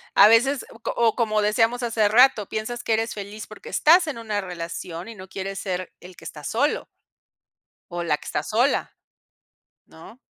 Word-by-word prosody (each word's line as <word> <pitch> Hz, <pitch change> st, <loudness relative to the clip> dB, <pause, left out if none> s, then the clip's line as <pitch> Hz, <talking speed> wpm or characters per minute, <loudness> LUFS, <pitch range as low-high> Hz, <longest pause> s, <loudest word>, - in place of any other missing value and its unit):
a -, -, +9 dB
veces, 245 Hz, +5 st, +3 dB
o 230 Hz, -, -15 dB, 0.2 s
o 230 Hz, -2 st, +2 dB
como 215 Hz, -3 st, +1 dB
decíamos 225 Hz, +3 st, +2 dB
hace 225 Hz, -3 st, +2 dB
rato, 225 Hz, -1 st, +5 dB
piensas 235 Hz, +3 st, -4 dB
que 225 Hz, -, 0 dB
eres 225 Hz, +1 st, 0 dB
feliz 205 Hz, +1 st, -8 dB
porque 215 Hz, -, -11 dB
estás 335 Hz, +2 st, +5 dB
en 300 Hz, -, -4 dB
una 215 Hz, -3 st, -3 dB
relación, 170 Hz, -1 st, -6 dB
y 230 Hz, -, -9 dB
no 190 Hz, -1 st, -11 dB
quieres 195 Hz, +1 st, -5 dB
ser 185 Hz, -2 st, -4 dB
el 180 Hz, 0 st, -13 dB
que 165 Hz, -, -15 dB
está 150 Hz, -2 st, -9 dB
solo 280 Hz, -, 0 dB, 1.1 s
o 175 Hz, 0 st, -3 dB
la 150 Hz, -3 st, +1 dB
que -, -, -16 dB
está -, -, -2 dB
sola -, -, 0 dB, 0.9 s
¿no? 195 Hz, +9 st, -15 dB
215 Hz, 180 wpm, -24 LUFS, 185-230 Hz, 1.1 s, a